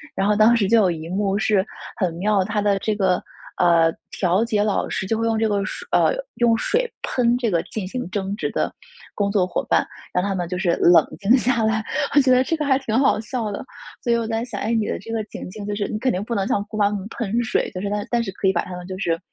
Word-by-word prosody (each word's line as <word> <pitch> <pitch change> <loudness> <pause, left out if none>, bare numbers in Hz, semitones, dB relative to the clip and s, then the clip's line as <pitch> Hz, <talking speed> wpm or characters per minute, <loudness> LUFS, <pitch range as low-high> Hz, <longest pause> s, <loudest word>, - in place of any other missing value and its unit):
然 195 - +1
后 210 - +3
当 220 +3 +5
时 210 -4 +2
就 230 +3 +4
有 190 -4 +3
一 160 0 -6
幕 195 +1 0
是 205 -2 +2 0.3
很 180 -5 0
妙， 200 +2 +2
它 210 +2 -1
的 200 -1 +2
这 215 +2 -1
个， 190 -3 +1 0.4
呃， 165 -2 +4 0.2
调 185 +3 +1
解 215 -3 +1
老 210 -2 0
师 - - -2
就 220 +3 0
会 225 - -1
用 225 -1 +1
这 220 0 +2
个 205 -2 0
水 - - -6
呃， - - +4 0.2
用 235 -1 +3
水 480 - 0
喷 240 -1 +2
这 240 -3 -1
个 170 -2 +2
进 190 +1 -5
行 250 -1 -5
争 195 0 -3
执 215 - -2
的 - - -1 0.4
工 200 -1 0
作 200 -3 +2
伙 180 - -2
伴， - - +2 0.3
让 180 - +1
他 200 0 -1
们 175 -2 -2
就 180 - -2
是 180 -1 +1
冷 175 0 +6
静 215 +6 +4
下 240 -2 +1
来， 220 0 +1 0.3
我 - - +8
觉 260 -1 +3
得 255 0 +5
这 325 +5 -1
个 300 - -2
还 270 -1 +3
挺 230 -4 -1
好 270 -5 +3
笑 220 0 -3
的。 200 - -5 0.4
所 240 - +1
以 - - +4
我 230 - -1
在 225 0 -1
想， 230 -5 -6
哎， 230 - -1
你 220 -2 +1
的 - - -2
这 225 - -9
个 225 -1 -1
情 - - -8
境 210 +1 -8
就 205 - -2
是 205 -1 -2
你 215 - -4
肯 255 +2 +1
定 185 -1 -2
不 235 - -4
能 195 -3 0
向 200 - 0
姑 215 0 -7
妈 205 -1 +3
她 205 - -3
们 200 0 -5
喷 230 +1 -1
水， 225 - 0
就 - - -3
是 200 - -2
她 205 0 -2
但 240 -1 +1
是 195 - -4
可 195 0 -2
以 190 - +3
把 170 - 0
她 180 - -7
们 180 0 -8
就 185 0 -6
是 170 -3 -1
210 Hz, 305 characters per minute, -22 LUFS, 190-230 Hz, 0.4 s, 我